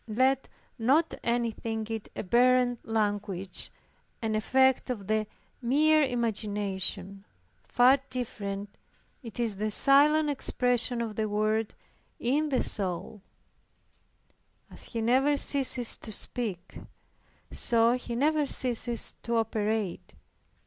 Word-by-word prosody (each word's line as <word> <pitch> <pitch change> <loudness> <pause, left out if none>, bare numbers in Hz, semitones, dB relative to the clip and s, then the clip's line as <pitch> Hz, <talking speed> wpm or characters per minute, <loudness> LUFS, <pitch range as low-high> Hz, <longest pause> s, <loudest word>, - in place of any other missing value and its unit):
Let 260 +4 +1 0.3
not 285 +8 +2
any 235 -1 0
think 220 0 -5
it 220 -2 -5
a - - -4
barren 245 +3 +3
language, 205 -4 0 0.5
and 220 -2 -2
effect 260 +4 +2
of 215 -6 -4
the 215 +1 0 0.3
mere 305 +5 +3
imagination. 205 -6 -2 0.4
Far 245 - +4
different 205 -5 -5 0.4
it 230 -3 -8
is 225 -4 0
the 215 +2 -1
silent 295 +7 +5
expression 245 -3 +1
of 220 -3 -5
the 215 -1 -1
Word 215 +1 -1 0.4
in 290 +6 0
the 265 - +1
soul. 190 +2 -3 1.5
As - - -8
He 230 - -4
never 265 +5 +2
ceases 260 -4 +1
to 220 - -8
speak, 200 -5 -4 0.7
so 230 -1 +3
He 245 -1 -4
never 300 +3 +1
ceases 240 -2 0
to 235 - -2
operate. 215 -3 -2
230 Hz, 115 wpm, -28 LUFS, 215-255 Hz, 1.5 s, silent